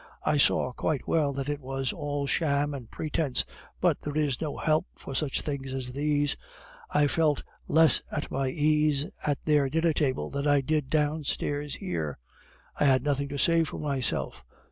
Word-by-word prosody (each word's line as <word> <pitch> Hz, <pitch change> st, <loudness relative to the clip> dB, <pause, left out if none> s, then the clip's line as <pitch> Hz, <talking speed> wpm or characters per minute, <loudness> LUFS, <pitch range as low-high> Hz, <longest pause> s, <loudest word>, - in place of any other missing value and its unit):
I 150 Hz, -, +2 dB
saw 130 Hz, -2 st, +3 dB
quite 145 Hz, +1 st, -2 dB
well 150 Hz, -3 st, +2 dB
that 135 Hz, 0 st, -4 dB
it 145 Hz, -1 st, -2 dB
was 135 Hz, -1 st, -3 dB
all 145 Hz, -1 st, -3 dB
sham 145 Hz, 0 st, +1 dB
and 125 Hz, -5 st, -7 dB
pretence, 155 Hz, -3 st, -1 dB, 0.3 s
but -, -, +2 dB
there 150 Hz, 0 st, -4 dB
is 145 Hz, -4 st, 0 dB
no 155 Hz, -3 st, -3 dB
help 155 Hz, 0 st, +1 dB
for -, -, -8 dB
such 140 Hz, 0 st, 0 dB
things 135 Hz, -3 st, -4 dB
as 125 Hz, -1 st, -2 dB
these. 145 Hz, +1 st, +1 dB, 0.5 s
I 150 Hz, 0 st, +3 dB
felt 150 Hz, 0 st, +2 dB, 0.2 s
less 160 Hz, 0 st, +6 dB
at 150 Hz, -, -4 dB
my 135 Hz, 0 st, 0 dB
ease 150 Hz, 0 st, +2 dB, 0.2 s
at 145 Hz, -2 st, +1 dB
their 150 Hz, -3 st, +3 dB
dinner 160 Hz, +3 st, +2 dB
table 135 Hz, -4 st, -1 dB
than 140 Hz, +1 st, -2 dB
I 145 Hz, -1 st, +4 dB
did 150 Hz, 0 st, -1 dB
downstairs 150 Hz, -1 st, -1 dB
here. 80 Hz, -5 st, -3 dB, 0.6 s
I -, -, +3 dB
had 130 Hz, -2 st, +4 dB
nothing 140 Hz, -1 st, 0 dB
to 140 Hz, -, -4 dB
say 165 Hz, +3 st, +4 dB
for 155 Hz, -, -5 dB
myself. 135 Hz, -, -2 dB
145 Hz, 175 wpm, -28 LUFS, 135-150 Hz, 0.6 s, less